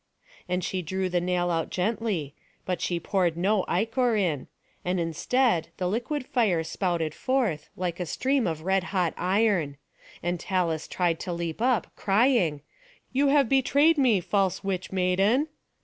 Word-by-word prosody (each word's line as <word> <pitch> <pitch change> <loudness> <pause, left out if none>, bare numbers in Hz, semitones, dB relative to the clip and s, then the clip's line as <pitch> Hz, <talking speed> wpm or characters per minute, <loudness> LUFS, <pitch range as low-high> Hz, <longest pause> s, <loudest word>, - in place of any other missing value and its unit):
And 180 0 0
she 185 +1 -2
drew 190 +3 -2
the 175 -1 +1
nail 175 0 0
out 165 -2 -1
gently; 190 -7 -1 0.3
but 180 -1 -2
she 175 -1 -1
poured 175 -1 0
no 195 +2 +2
ichor 225 +5 +1
in; 170 -10 0 0.4
and 180 0 0
instead 170 - +1
the 180 - -1
liquid 245 +8 -2
fire 205 -12 +1
spouted 165 -2 -1
forth, 235 - -1
like 175 -1 -3
a 180 - -3
stream 265 - +1
of 160 -2 -3
red 190 +1 +1
hot 180 -5 0
iron. 185 -6 +1 0.5
And 175 0 -1
Talus 170 -4 -1
tried 170 -3 0
to 180 - -4
leap 170 +2 -4
up, 250 -1 +1
crying, 195 - +2 0.5
"You 280 +2 +3
have 280 -2 +4
betrayed 285 +5 +3
me, 235 -8 +4
false 195 +1 0
witch 185 -2 -3
maiden!" 195 +10 +2
185 Hz, 155 wpm, -26 LUFS, 170-225 Hz, 0.5 s, have